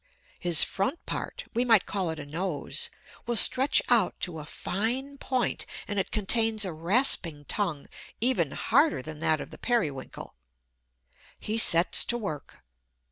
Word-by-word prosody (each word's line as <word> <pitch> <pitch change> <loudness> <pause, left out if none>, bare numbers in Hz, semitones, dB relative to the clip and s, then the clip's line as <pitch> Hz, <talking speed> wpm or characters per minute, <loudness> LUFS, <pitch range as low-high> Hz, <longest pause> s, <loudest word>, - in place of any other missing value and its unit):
His 170 -3 +7
front 225 - -3
part - - -6
we 240 +1 0
might 225 -5 +3
call 190 -4 -3
it 160 - -5
a 145 - -8
nose 165 +1 -2 0.4
will 240 - -2
stretch 260 +5 +5
out 230 -7 +1
to 170 -3 -3
a 150 - -9
fine 245 - -4
point; 255 -2 -2 0.2
and 205 -1 -3
it 190 - -3
contains 220 +1 +1
a 180 - -5
rasping 165 - 0
tongue 170 -8 -3 0.3
even 225 - 0
harder 265 - +1
than 155 +1 -9
that 155 0 +1
of - - -9
the - - -13
Periwinkle. 155 - -3 1.1
He 220 +2 -3
sets 170 -4 +6
to 240 - 0
work. 155 - -8
200 Hz, 150 wpm, -26 LUFS, 160-240 Hz, 1.1 s, His